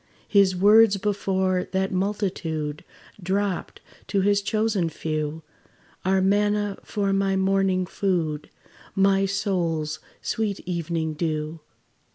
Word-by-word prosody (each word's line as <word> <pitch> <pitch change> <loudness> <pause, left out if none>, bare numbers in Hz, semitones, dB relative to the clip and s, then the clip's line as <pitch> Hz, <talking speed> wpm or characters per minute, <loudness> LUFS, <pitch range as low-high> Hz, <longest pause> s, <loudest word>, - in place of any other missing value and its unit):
His 195 -2 +4
words 205 +2 +6
before 190 -2 0
that 190 0 0
multitude 185 -6 -2 0.4
Dropt 190 0 -2 0.3
to 200 - +1
his 200 +1 +3
chosen 215 -4 0
few, 155 0 -3 0.6
Are 190 0 +2
manna 205 +1 +1
for 200 -2 -1
my 195 0 +1
morning 190 -1 +2
food, 170 -6 -1 0.5
My 195 0 +3
soul's 170 -6 -1 0.2
sweet 215 -4 -1
evening 170 -2 -2
dew. 155 0 -3
190 Hz, 105 wpm, -25 LUFS, 170-200 Hz, 0.6 s, words